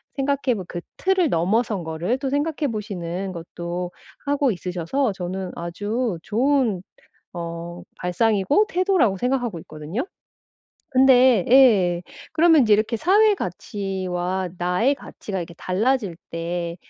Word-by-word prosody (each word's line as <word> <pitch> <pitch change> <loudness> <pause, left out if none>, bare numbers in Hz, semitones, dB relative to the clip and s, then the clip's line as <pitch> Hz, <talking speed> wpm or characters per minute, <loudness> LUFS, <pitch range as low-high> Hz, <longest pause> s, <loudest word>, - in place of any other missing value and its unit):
생각해 275 -3 0
보 190 - -5
그 175 - -5 0.2
틀을 375 -5 +2
넘어선 195 +3 +1
거를 165 +10 -2
또 270 -1 -3
생각해 290 -1 -1
보시는 190 -3 -4
것도 175 +1 -5 0.3
하고 280 -3 +2
있으셔서 185 +7 -1
저는 185 0 -4
아주 205 +5 -2
좋은 240 -5 +1 0.5
어 170 0 -6 0.2
발상이고 215 - +2
태도라고 360 - +2
생각하고 245 -5 -1
있거든요. 155 - -5 0.9
근데 255 -5 +5
예. 200 -10 +5 0.3
그러면 320 -3 +5
이제 215 -2 +3
이렇게 215 +2 0
사회 410 - +4
가치와 185 - -3
나의 180 +10 +2
가치가 195 -3 -7
이렇게 170 -1 -6
달라질 205 -1 0
때 170 +1 -3
205 Hz, 275 characters per minute, -23 LUFS, 175-265 Hz, 0.9 s, 근데